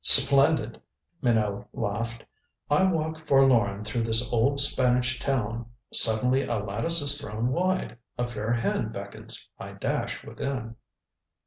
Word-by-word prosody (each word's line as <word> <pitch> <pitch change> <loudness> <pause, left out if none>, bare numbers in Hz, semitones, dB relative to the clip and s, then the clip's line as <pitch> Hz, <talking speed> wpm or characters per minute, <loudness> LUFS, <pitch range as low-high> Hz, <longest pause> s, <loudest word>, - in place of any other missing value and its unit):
"Splendid," 135 -3 +7 0.4
Minot 110 -4 0
laughed. 115 +2 -4 0.5
"I 150 +6 +4
walk 160 -1 -3
forlorn 115 -7 +3
through 110 +2 -2
this 115 +2 +4
old 135 +5 +1
Spanish 125 -3 +1
town 115 -4 -2 0.3
suddenly 125 +4 +2
a 120 - -2
lattice 115 +11 0
is 145 0 +3
thrown 110 +4 -3
wide, 180 -5 -2 0.2
a 120 - -2
fair 110 -1 -4
hand 120 -1 -1
beckons. - - -7
I - - -9
dash - - -3
within." 125 -4 -6
120 Hz, 125 wpm, -26 LUFS, 115-140 Hz, 0.5 s, Splendid